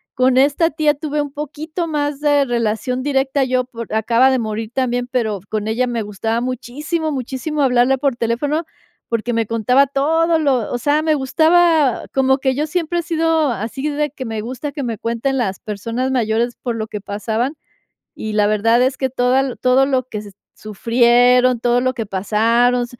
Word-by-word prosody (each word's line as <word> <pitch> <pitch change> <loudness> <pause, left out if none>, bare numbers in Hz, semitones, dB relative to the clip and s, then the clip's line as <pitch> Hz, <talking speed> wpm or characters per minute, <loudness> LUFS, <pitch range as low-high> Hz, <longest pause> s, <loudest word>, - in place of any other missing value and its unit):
Con 255 0 +3
esta 290 +5 +3
tía 300 0 +1
tuve 295 +1 -2
un 290 -1 -5
poquito 305 +4 -5
más 290 -2 -2
de 290 -1 +3
relación 240 +1 -1
directa 270 0 +1
yo, 255 -1 0
por 230 -3 -8
acaba 230 +4 +3
de 260 - +1
morir 220 0 -4
también, 245 -1 0
pero 230 -5 -1
con 215 -1 -2
ella 230 +3 +1
me 240 -2 -2
gustaba 220 +3 -2
muchísimo, 290 +6 -3
muchísimo 270 +3 -3
hablarle 260 0 +3
por 275 -2 0
teléfono, 250 +7 -1 0.5
porque 230 +1 -1
me 230 0 +1
contaba 230 +5 +3
todo 320 +4 +1
lo 265 -7 0
o - - 0
sea, 295 +5 +1
me 315 -1 +2
gustaba 315 0 +3
como 265 0 +2
que 265 -1 0
yo 295 +3 0
siempre 345 +1 -2
he - - 0
sido 325 -3 +1
así 235 +6 -4
de 295 +1 -1
que 260 -2 -8
me 220 -2 -4
gusta 255 +6 -5
que 285 0 -6
me 230 -3 -3
cuenten 235 +5 -2
las 195 -7 -2
personas 230 +4 -3
mayores 235 -1 0
por 240 -2 -2
lo 220 -1 -4
que 210 -1 -6
pasaban, 220 +6 -2 0.6
y 215 0 -5
la 210 -1 +3
verdad 225 +3 +2
es 260 +2 +1
que 265 - -1
toda 255 +1 +1
todo 255 +1 +3
lo 265 -2 0
que 210 - -5
se 205 -1 -11 0.2
sufrieron, 240 +3 +3
todo 240 0 +2
lo 255 +1 0
que 230 -3 -4
pasaron, 230 +5 +1
255 Hz, 185 wpm, -19 LUFS, 230-285 Hz, 0.6 s, Con